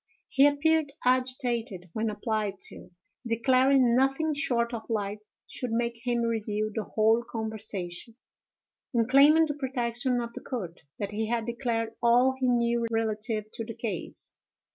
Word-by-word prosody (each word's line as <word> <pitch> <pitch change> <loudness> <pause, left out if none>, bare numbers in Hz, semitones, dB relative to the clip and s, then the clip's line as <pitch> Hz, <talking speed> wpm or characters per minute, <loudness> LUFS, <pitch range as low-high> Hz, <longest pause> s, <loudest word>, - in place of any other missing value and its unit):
He 275 +2 +5
appeared 300 +1 +2
agitated 250 -8 0
when 220 0 -1
applied 210 -2 -2
to, - - -12 0.4
declaring 255 +1 +4
nothing 270 +4 +2
short 240 -5 0
of 225 0 -6
life 210 -2 -2 0.3
should 250 - -5
make 235 0 -1
him 240 -1 +1
reveal 215 -2 -1
the 215 -1 -3
whole 220 +2 +3
conversation, 220 -3 -5 0.8
and, 230 -1 +3
claiming 290 +5 +6
the 295 - -2
protection 250 -2 -1
of 235 -1 -5
the 255 - -7
court, 195 -11 -6 0.2
that 200 0 -4
he 215 +1 -2
had 230 0 -1
declared 235 -2 -2
all 245 +2 +4
he 260 - +1
knew 235 -1 +2
relative 220 -1 -1
to 225 - -5
the 225 0 -7
case. 205 -8 -5
235 Hz, 145 wpm, -28 LUFS, 220-255 Hz, 0.8 s, claiming